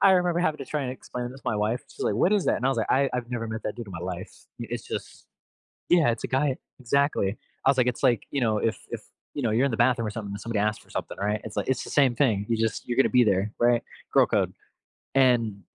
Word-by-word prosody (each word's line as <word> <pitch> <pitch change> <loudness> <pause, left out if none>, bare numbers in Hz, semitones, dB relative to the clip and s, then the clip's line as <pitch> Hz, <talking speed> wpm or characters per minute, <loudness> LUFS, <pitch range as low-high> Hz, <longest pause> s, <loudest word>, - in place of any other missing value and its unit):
I 195 - +7
remember 175 -1 +2
having 155 -3 +1
to 135 - -5
try 150 +2 -2
and 125 - -2
explain 125 -1 -6
this 135 +1 -11
to - - -34
my 115 -3 0
wife. 110 +4 0
She's, - - -8
like, 100 - +1
"What 180 - +3
is 205 -3 +2
that," - - +3
and 125 - -4
I - - +4
was 135 -4 +1
like, 110 - -1
"I 135 +1 +3
I've 125 -1 -3
never 115 -2 -2
met 110 0 -5
that 105 - -3
dude 120 - -6
in 100 - -9
my 85 - -5
life." 90 +1 -5 0.3
It's 120 0 -5
just - - -6 0.6
yeah, 165 -8 +5
it's 115 - -5
a - - -5
guy 135 0 +1 0.2
exactly. 130 -5 +1 0.3
I - - +6
was 135 - +4
like, 125 -1 +3
"It's, 125 +2 -2
like, 120 -6 +3
you 140 - -1
know, 110 -2 +2
if 110 +1 0
if, - - -4 0.3
you 145 - -3
know, 115 -3 +1
you're 120 +5 +3
in 135 - 0
the 110 - -2
bathroom, 120 -3 +3
or - - -1
something, 105 -2 -5
and 100 - -6
somebody 115 -2 -2
asks 105 +1 0
for - - -26
something, - - -5
right? 105 +2 -1
It's 110 - -7
like - - -1
it's 130 - 0
the - - -8
same 135 -4 +4
thing. 110 -6 +2
You 115 - +2
just 110 0 -1
you're 120 +1 -2
gonna 135 - +5
be 125 -1 +5
there, 100 0 +1
right?" 120 0 +4 0.3
Girl - - +6
code, - - +1 0.6
and 120 -6 +3
120 Hz, 285 wpm, -26 LUFS, 110-135 Hz, 0.6 s, I